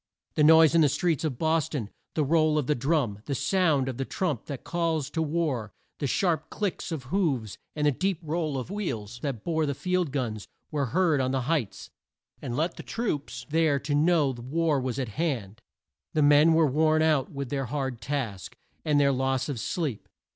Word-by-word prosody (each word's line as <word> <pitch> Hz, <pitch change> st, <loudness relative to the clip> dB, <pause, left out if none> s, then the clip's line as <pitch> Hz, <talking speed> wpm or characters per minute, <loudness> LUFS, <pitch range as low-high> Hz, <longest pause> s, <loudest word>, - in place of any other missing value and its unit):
The 150 Hz, -, +2 dB
noise 160 Hz, +1 st, +7 dB
in 165 Hz, -, +5 dB
the 150 Hz, -, +5 dB
streets 155 Hz, +2 st, 0 dB
of 145 Hz, -6 st, -2 dB
Bos 160 Hz, +1 st, +1 dB
ton, 120 Hz, -10 st, -4 dB, 0.2 s
the 155 Hz, -, +2 dB
roll 155 Hz, +1 st, +3 dB
of 150 Hz, -, +1 dB
the 150 Hz, -, +2 dB
drum, 135 Hz, -6 st, 0 dB
the 140 Hz, -, -2 dB
sound 160 Hz, -6 st, +2 dB
of 130 Hz, -3 st, -4 dB
the 135 Hz, -, -1 dB
trump 145 Hz, -, -2 dB
that 140 Hz, -4 st, -6 dB
calls 165 Hz, -4 st, -1 dB
to 160 Hz, -, -1 dB
war, 150 Hz, -9 st, -1 dB, 0.3 s
the 140 Hz, -, -1 dB
sharp 160 Hz, 0 st, 0 dB
click 205 Hz, -4 st, -2 dB
of 155 Hz, -5 st, -4 dB
hoofs, 135 Hz, -, -1 dB, 0.2 s
and 150 Hz, -1 st, 0 dB
the 145 Hz, -, +5 dB
deep 185 Hz, +6 st, -1 dB
roll 155 Hz, -2 st, -2 dB
of 130 Hz, +7 st, -5 dB
wheels 120 Hz, -, -4 dB
that 135 Hz, -7 st, -3 dB
bore 160 Hz, -2 st, 0 dB
the 140 Hz, -, -1 dB
field 180 Hz, -1 st, -1 dB
guns, 115 Hz, -7 st, -3 dB, 0.2 s
were 145 Hz, -3 st, 0 dB
heard 160 Hz, -1 st, +2 dB
on 130 Hz, -, 0 dB
the 130 Hz, 0 st, 0 dB
heights, 135 Hz, -5 st, -2 dB, 0.5 s
and 120 Hz, -, -4 dB
let 165 Hz, +3 st, -1 dB
the -, -, -6 dB
troops 145 Hz, -, -3 dB
there 160 Hz, -3 st, +3 dB
know 150 Hz, -1 st, +3 dB
that 120 Hz, -, -9 dB
war 150 Hz, +2 st, 0 dB
was 130 Hz, 0 st, -3 dB
at 130 Hz, -4 st, -2 dB
hand. 115 Hz, -, -3 dB, 0.5 s
The 155 Hz, -, +3 dB
men 150 Hz, +3 st, +6 dB
were 160 Hz, -1 st, +5 dB
worn 155 Hz, +3 st, +3 dB
out 155 Hz, -4 st, +2 dB
with 140 Hz, -3 st, -5 dB
their 135 Hz, -2 st, -1 dB
hard 130 Hz, -2 st, -3 dB
task, 125 Hz, -10 st, -4 dB, 0.3 s
and 150 Hz, -2 st, +2 dB
their 140 Hz, -1 st, +4 dB
loss 130 Hz, +1 st, 0 dB
of 135 Hz, -5 st, -3 dB
sleep. 140 Hz, -, -3 dB
145 Hz, 200 wpm, -27 LUFS, 130-160 Hz, 0.5 s, noise